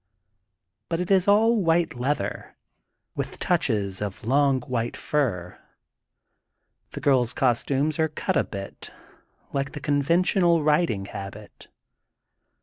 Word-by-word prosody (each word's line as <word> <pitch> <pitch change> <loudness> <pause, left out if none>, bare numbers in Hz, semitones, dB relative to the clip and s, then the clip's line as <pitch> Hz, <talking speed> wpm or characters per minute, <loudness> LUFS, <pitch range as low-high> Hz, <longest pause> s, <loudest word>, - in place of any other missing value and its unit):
But 165 -1 -1
it 180 +2 -2
is 190 -1 +4
all 225 +3 +5
white 165 -1 +2
leather, 125 -5 -3 0.6
with - - -5
touches 100 -3 0
of 105 0 -5
long 135 +1 +3
white 120 -2 -3
fur. 95 -12 -2 1.3
The - - -6
girPs 125 -4 +2
cos 125 -3 +2
tumes 145 +3 -1
are 160 - +3
cut 150 - -2
a - - +3
bit 100 -1 -8 0.6
like 135 0 -2
the 150 - -6
conventional 170 +4 +2
rid 155 +3 +3
ing 100 -3 -3
habit. 100 +1 -9
140 Hz, 125 wpm, -25 LUFS, 110-165 Hz, 1.3 s, all